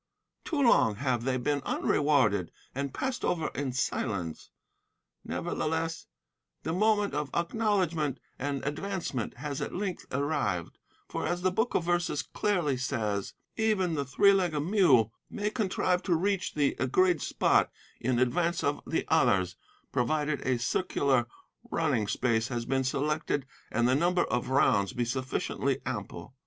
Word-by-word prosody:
Too 315 Hz, -, -1 dB
long 230 Hz, -, +4 dB
have 125 Hz, 0 st, -1 dB
they 130 Hz, -1 st, +1 dB
been 140 Hz, +3 st, 0 dB
unrewarded 130 Hz, -, +2 dB, 0.2 s
and 140 Hz, +1 st, -3 dB
passed 260 Hz, -, -3 dB
over 165 Hz, -3 st, 0 dB
in 135 Hz, +1 st, -3 dB
silence. 100 Hz, -9 st, -2 dB, 0.7 s
Nevertheless, 160 Hz, +1 st, -2 dB, 0.6 s
the 160 Hz, -, -2 dB
moment 205 Hz, 0 st, +2 dB
of 145 Hz, -1 st, -2 dB
acknowledgement 170 Hz, -, 0 dB, 0.2 s
and 140 Hz, 0 st, -2 dB
advancement 150 Hz, -, -3 dB
has 140 Hz, +2 st, -4 dB
at -, -, -4 dB
length 190 Hz, -1 st, -3 dB
arrived; 140 Hz, -, -1 dB, 0.3 s
for, -, -, -3 dB
as 175 Hz, 0 st, -2 dB
the 185 Hz, -, +3 dB
Book 220 Hz, +6 st, 0 dB
of -, -, +2 dB
Verses 175 Hz, -4 st, 0 dB
clearly 175 Hz, -10 st, 0 dB
says, 110 Hz, -6 st, -2 dB, 0.2 s
"Even 210 Hz, -6 st, +1 dB
the 145 Hz, -2 st, 0 dB
three 200 Hz, +10 st, +4 dB
legged 175 Hz, -6 st, +1 dB
mule 150 Hz, -, +4 dB, 0.2 s
may 210 Hz, 0 st, -2 dB
contrive 185 Hz, -4 st, 0 dB
to 180 Hz, -4 st, +1 dB
reach 195 Hz, +2 st, 0 dB
the 145 Hz, -2 st, +2 dB
agreed 165 Hz, +6 st, +3 dB
spot -, -, +2 dB, 0.3 s
in 125 Hz, +1 st, 0 dB
advance 165 Hz, +8 st, +1 dB
of 145 Hz, +1 st, 0 dB
the 165 Hz, -, -1 dB
others, 100 Hz, -, +3 dB, 0.4 s
provided 150 Hz, +3 st, 0 dB
a 130 Hz, -1 st, +1 dB
circular 130 Hz, -1 st, +1 dB, 0.4 s
running 140 Hz, -10 st, +1 dB
space 115 Hz, 0 st, +1 dB
has 120 Hz, -2 st, -3 dB
been 135 Hz, +1 st, +1 dB
selected 145 Hz, +1 st, -1 dB, 0.3 s
and 120 Hz, +1 st, +2 dB
the 125 Hz, -, +3 dB
number 175 Hz, +5 st, +3 dB
of 120 Hz, +2 st, -2 dB
rounds 100 Hz, -7 st, +3 dB
be 120 Hz, -, 0 dB
sufficiently 130 Hz, +2 st, -1 dB
ample." 85 Hz, +9 st, -5 dB
145 Hz, 145 wpm, -29 LUFS, 125-175 Hz, 0.7 s, long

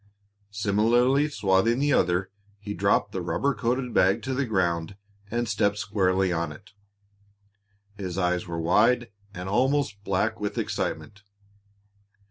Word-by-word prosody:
Similarly 115 Hz, +7 st, +2 dB
swathing 105 Hz, -2 st, +2 dB
the 145 Hz, +1 st, +2 dB
other, 90 Hz, 0 st, +1 dB, 0.3 s
he 105 Hz, 0 st, -6 dB
dropped -, -, +1 dB
the -, -, -3 dB
rubber 140 Hz, 0 st, 0 dB
coated 125 Hz, +2 st, -2 dB
bag 95 Hz, +1 st, +3 dB
to 130 Hz, -, -2 dB
the 130 Hz, 0 st, -1 dB
ground 85 Hz, -3 st, -1 dB, 0.3 s
and 120 Hz, +1 st, -1 dB
stepped 100 Hz, -1 st, +1 dB
squarely 95 Hz, -3 st, +1 dB
on 85 Hz, -2 st, -2 dB
it. 95 Hz, +7 st, -14 dB, 1.3 s
His 95 Hz, -3 st, -5 dB
eyes 90 Hz, -1 st, 0 dB
were 85 Hz, -1 st, -4 dB
wide 115 Hz, +8 st, +2 dB, 0.2 s
and 90 Hz, +1 st, -6 dB
almost 120 Hz, -1 st, 0 dB
black 105 Hz, +4 st, -1 dB
with 105 Hz, -1 st, -4 dB
excitement. 100 Hz, -1 st, -3 dB
105 Hz, 130 wpm, -26 LUFS, 95-120 Hz, 1.3 s, bag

